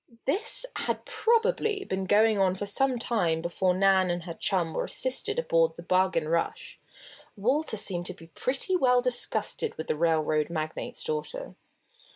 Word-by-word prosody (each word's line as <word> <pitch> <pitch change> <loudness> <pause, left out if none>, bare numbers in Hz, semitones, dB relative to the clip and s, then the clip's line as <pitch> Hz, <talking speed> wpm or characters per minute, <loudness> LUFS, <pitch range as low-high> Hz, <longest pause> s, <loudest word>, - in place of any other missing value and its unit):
This 430 - +2
had - - -2
probably 450 -3 +1
been 190 0 -3
going 215 +1 +4
on 185 -1 +2
for 205 - -4
some 255 +5 +1
time 180 -9 0
before 180 +2 0
Nan 190 -1 +3
and 175 0 -2
her 170 -1 -6
chum 170 -2 -1
were - - -1
assisted - - -1
aboard 165 - +2
the 170 - -10
Bargain 185 -2 +1
Rush. 165 +1 -2 0.6
Walter 255 +4 0
seemed 180 -4 -1
to 185 - -5
be 165 - -14
pretty 265 - -1
well 250 -7 +3
disgusted 240 -4 -1
with 160 - -4
the - - -1
railroad 155 -1 +1
magnate's 160 - -4
daughter. 475 +2 -4
195 Hz, 160 wpm, -27 LUFS, 170-270 Hz, 0.6 s, going